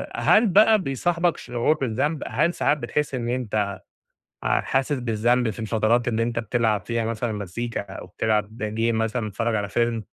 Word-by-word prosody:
هل 220 +2 +4
بقى 215 +3 +5
بيصاحبك 170 +4 0
شعور 120 +5 0
بالذنب؟ 135 +4 -1
هل 165 +5 +1
ساعات 150 - +1
بتحسّ 140 +2 -2
إن 120 -2 -3
أنت 110 -5 -1 0.7
آآ - - +2
حاسس 135 +2 0
بالذنب 120 0 +1
في 105 - -9
الفترات 110 +2 +1
اللي 115 -1 0
أنت 115 0 -1
بتلعب 115 -2 0
فيها 115 -1 -1
مثلًا 115 +1 -2
مزيكا 105 +4 -4
أو 95 -1 -9
بتلعب 110 +3 -1 0.2
game 115 +1 +1
مثلًا 110 0 -1
بتتفرج 115 +3 -1
على 100 -1 -2
film 115 +2 0
115 Hz, 165 wpm, -24 LUFS, 110-130 Hz, 0.7 s, بقى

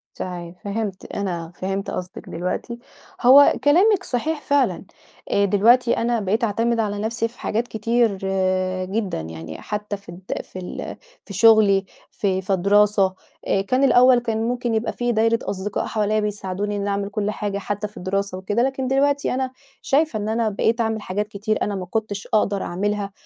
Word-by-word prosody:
صحيح، 175 -1 -6
فهِمت، 200 -2 -4
أنا 175 -4 -4
فهِمت 195 +1 -3
قصدِك 180 0 -6
دلوقتي. 180 +7 -4 0.4
هو 270 +4 +8
كلامِك 370 +7 +4
صحيح 300 +4 -2
فعلًا، 265 -12 +1 0.5
آآ، 200 - +3
دلوقتي 230 +5 +4
أنا 235 0 +1
بقيت 210 +3 0
أعتمد 230 +2 +1
على 205 -2 -1
نَفْسي 230 +2 -1
في 240 +2 -20
حاجات 230 +3 -1
كتير 230 -1 +1 0.7
جدًا، 195 - -2
يعني 80 0 -8
حتى 210 -1 -4
في 200 - -18
الد 180 +2 -5
في 185 - -10
ال 180 - -6 0.3
في 200 - -9
شغلي 205 -1 +5 0.3
في 190 -2 -1
في 190 +1 0
دراسة، 200 0 +3 0.3
آآ، 195 - +2
كان 255 +7 +1
الأول 255 -2 +6
كان 230 -2 -2
ممكن 245 -1 -1
يبقى 220 +1 -1
في 240 0 -1
دايرة 225 0 +2
أصدقاء 200 +1 -3
حواليَّ 215 0 0
بيساعدوني 205 0 -3
إني 200 0 -2
أعمل 200 0 -1
كُلّ 205 0 -1
حاجة 205 -1 -3
حتى 205 +1 -3
في 210 - -18
الدراسة 195 +1 -2
وكده، 205 +5 -1
لكن 265 0 -1
دلوقتي 280 +2 +1
أنا 260 0 -1 0.3
شايفة 295 -4 +1
إن 210 +1 -3
أنا 225 0 +1
بقيت 225 +3 +1
أعمِل 220 -1 -1
حاجات 205 +1 -2
كتير 215 +1 -2
أنا 205 - -1
ما 185 -2 -4
كُنتش 205 +1 -3
أقدر 205 -2 +2
أعملها 200 +2 -2
210 Hz, 170 wpm, -22 LUFS, 195-235 Hz, 0.7 s, هو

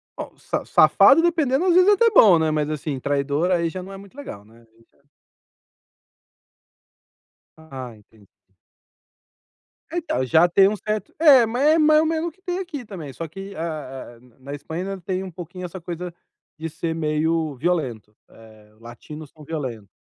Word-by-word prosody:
Bom, - - -8
sa - - -4
safado, 330 - +6
dependendo, 325 -2 +1
às 355 - +4
vezes, 365 +3 +5
é - - +7
até 460 +3 +4
bom, 205 - +7
né, 160 -1 +1
mas, 150 -1 -1
assim, 150 -2 -4
traidor 145 +5 -1
aí 170 -2 +1
já 185 +2 -6
não 190 - -10
é 195 - -8
muito 200 +5 -15
legal, 105 - -9
né, 115 +2 -20
aí 115 - -25
já - - -34 2.5
Ah, 135 -6 -9
entendi. 105 -1 -22 1.6
Então, 335 - -2
já 160 +7 +4
tem 190 +2 +5
um 210 - 0
certo 215 +1 -4
É, 275 -7 +7
mas 245 +4 -2
é - - +3
mais 305 -1 +5
ou - - 0
menos 325 +1 -1
o - - -17
que 375 - -32
tem 360 0 -3
aqui 310 -9 -6
também, 170 -9 -8
só 165 +5 -6
que, 195 +5 -9
eh - - -14
eh, 145 -7 -6
na 125 0 -24
na - - -4
Espanha 160 +4 -6
ainda 195 -1 -6
tem 185 +1 -3
um 185 - -8
pouquinho 180 +2 -8
essa 180 +2 -8
coisa 175 +1 -6 0.4
de 165 +1 -5
ser 160 +1 -4
meio 155 -1 -1
violento, 125 -9 -2
eh: 110 -1 -18
latinos 140 +6 -11
são 155 -2 -16
violento. 130 -10 -6
165 Hz, 185 wpm, -22 LUFS, 140-215 Hz, 2.5 s, é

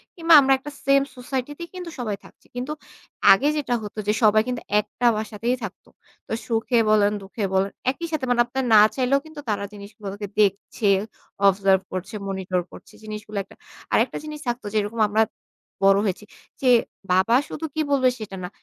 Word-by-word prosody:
কিংবা 335 -1 +3
আমরা 270 0 +4
একটা 290 +2 -9
সেম 275 0 +5 0.2
সোসাইটি 260 +1 -4
তেই 340 - -6
কিন্তু 360 -2 -6
সবাই 215 -4 -2
থাকছি। - - -19
কিন্তু 255 +4 -4 0.6
আগে 270 +10 +5
যেটা 280 -4 -1
হতো 210 +1 -7
যে 210 - +3
সবাই 215 0 +6
কিন্তু 250 -1 -3 0.2
একটা 210 +4 -4
বাসাতেই 220 +3 -2
থাকত। 205 -3 -7 0.4
তো - - -4
সুখে 230 +1 0
বলেন, 210 -1 +4
দুঃখে 200 +3 -6
বলেন 190 +1 +2 0.2
একই 335 +5 -6
সাথে 305 -5 -1
মানে 245 -1 +4
আপনার 265 +2 -3
না 210 - +9
চাইলেও 265 +2 +2
কিন্তু 315 -1 -11
তারা 200 -1 -1
জিনিসগুলোকে 205 0 -8
দেখছে, 205 +1 +1 0.6
অবজার্ভ 195 -1 +3
করছে, 185 +3 -5
মনিটর 190 -2 -1
করছে - - -14
জিনিসগুলো, 215 -1 -7 0.6
আরেকটা - - +2
জিনিস 305 0 -7
থাকতো 240 -2 -2
যেরকম 215 +1 -1
আমরা 215 +2 +4 0.6
বড় 195 0 +6
হয়েছি 200 +1 -2 0.4
যে 260 - +3 0.4
বাবা 190 +6 +4
শুধু 320 - -5
কি 315 - +1
বলবে 260 -2 +4
সেটা 210 -4 -7
না। 180 - -4
220 Hz, 170 wpm, -23 LUFS, 205-260 Hz, 0.6 s, না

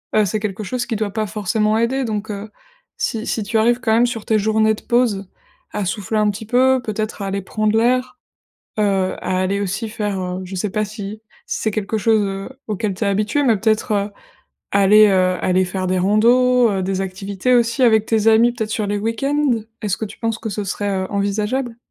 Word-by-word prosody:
Heu 215 - +5
c'est 210 +3 -1
quelque 210 0 -3
chose 240 +4 -3
qui 225 - -2
doit 210 -1 -1
pas 215 0 -2
forcément 215 +1 0
aider. 255 +4 0
Donc, 215 -1 -3
heu, 205 +1 -6 0.5
si 225 0 -2
si 220 - -1
tu 220 +3 -1
arrives 235 +2 +3
quand 225 - 0
même 235 +2 +4
sur 225 -3 -4
tes 220 -1 +2
journées 220 +1 +2
de - - -13
pause, 225 -6 +1 0.4
à 210 - -2
souffler 205 +3 -2
un 210 0 +3
petit 215 +2 -8
peu, 260 +2 +3
peut-être 215 0 -4
à - - -3
aller 195 +1 -2
prendre 215 +2 0
l'air, 255 +5 +1 0.6
heu, 195 -3 +1
à 185 - 0
aller 195 +2 0
aussi 200 +4 -3
faire, 210 -3 -3
heu, 180 0 -4
je 185 - -9
sais 200 +3 -2
pas 215 0 0
si 210 0 -7 0.3
si - - -3
c'est 220 - 0
quelque 215 +1 -2
chose, 220 0 +3
heu, 195 +2 -4 0.2
auquel 210 -1 -2
tu 225 - -3
es - - +1
habitué, 210 +8 +1
mais 235 -5 +3
peut-être, 215 +2 0
heu, 200 0 0 0.7
aller, 210 +2 +7
heu, 185 -1 +2
aller 185 0 +2
faire 185 0 -3
des 185 0 +1
randonnées, 240 +5 +4
heu, 195 -1 -1
des 190 0 -1
activités 195 +5 -1
aussi 235 +2 +2
avec 220 -2 +4
tes 220 -1 +1
amis, 225 +2 +5
peut-être, 220 -2 -4
sur 215 -1 -1
les 205 0 -1
week-end? 275 +6 0 0.3
Est-ce 205 -3 -1
que - - -2
tu - - -13
penses 225 -1 -2
que 225 - -5
ce 205 +1 -3
serait, 205 +1 -3 0.2
heu, - - -4
envisageable? 210 +5 -1
215 Hz, 220 wpm, -20 LUFS, 200-225 Hz, 0.7 s, aller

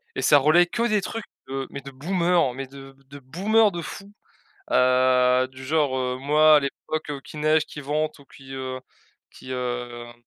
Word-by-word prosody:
Et - - -2
ça 145 - +6
relaie 155 +5 +4
que 235 +6 -1
des 215 -3 +1
trucs, 225 +3 -5 0.2
heu, 135 0 -4
mais 140 - -7
de 140 +1 -10
boomers, 170 0 +1
mais 135 +2 -5
de 135 0 -13
de 140 +1 -10
boomers 200 - +2
de 170 - -4
fou, 200 +5 -9 0.6
heu, 125 0 +3
du 130 0 -11
genre, 145 -2 +1
heu: 125 0 -2
«Moi, 150 +2 +5
à - - +4
l'époque 150 +2 -4
qu'il 150 - -9
neige, 155 0 +3
qu'il 150 - -9
vente 150 +2 -2
ou - - -17
qu'il, 135 0 -12
heu, 130 -1 -5 0.5
qu'il, 130 - -12
hem, 120 -1 -4
140 Hz, 185 wpm, -24 LUFS, 130-155 Hz, 0.6 s, ça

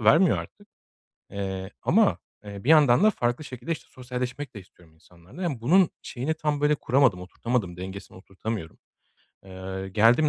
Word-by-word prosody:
vermiyor 155 - +5
artık, 205 0 -10 0.6
eee, 95 -1 -4
ama, - - +3 0.3
eee, 100 0 -8
bir - - -3
yandan 145 -3 +6
da 215 - +7
farklı 120 - -1
şekilde 130 +3 -5
işte 165 - -6
sosyalleşmek 125 +2 -5
de 105 - -7
istiyorum 85 -3 -21
insanlarla. 90 - -13
Emm, 145 -9 -2
bunun 175 +9 +4
şeyini 140 +5 -3
tam 150 -2 -1
böyle 150 +1 +4
kuramadım, 130 -9 +2
oturtamadım, 95 -1 -2
dengesini 95 +2 -8
oturtamıyorum. 95 -2 -6 0.7
Eee, 95 0 -6
geldiğim 115 +9 +4
120 Hz, 150 wpm, -26 LUFS, 95-145 Hz, 0.7 s, da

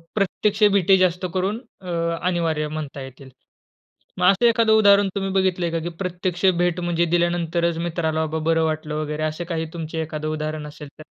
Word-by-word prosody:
प्रत्यक्ष 210 +1 0
भेटी 195 -1 +4
जास्त 185 0 +1
करून 195 +4 -1 0.2
अ, 180 - -9 0.4
अनिवार्य 165 -4 0
म्हणता 150 -2 -6
येतील. 130 0 -11 0.9
मग 180 - +1
असं 200 +5 +1
एखादं 230 -1 +3
उदाहरण 200 -2 +5
तुम्ही 195 -1 -2
बघितलंय 185 -2 +1
का, 165 - -1
की 170 +2 -4
प्रत्यक्ष 180 0 -2
भेट 175 0 +1
म्हणजे 170 0 +1
दिल्यानंतरच 170 -1 0
मित्राला 160 -2 -1
बाबा 160 +1 -3
बरं 165 0 +2
वाटलं 155 -1 -3
वगैरे 150 0 -3
असं 155 +2 -2
काही 165 -1 -2
तुमचं 165 -1 -6
एखादं 155 -1 -4
उदाहरण 155 -1 -4
असेल 150 0 -10
तर? - - -9
170 Hz, 170 wpm, -22 LUFS, 155-185 Hz, 0.9 s, उदाहरण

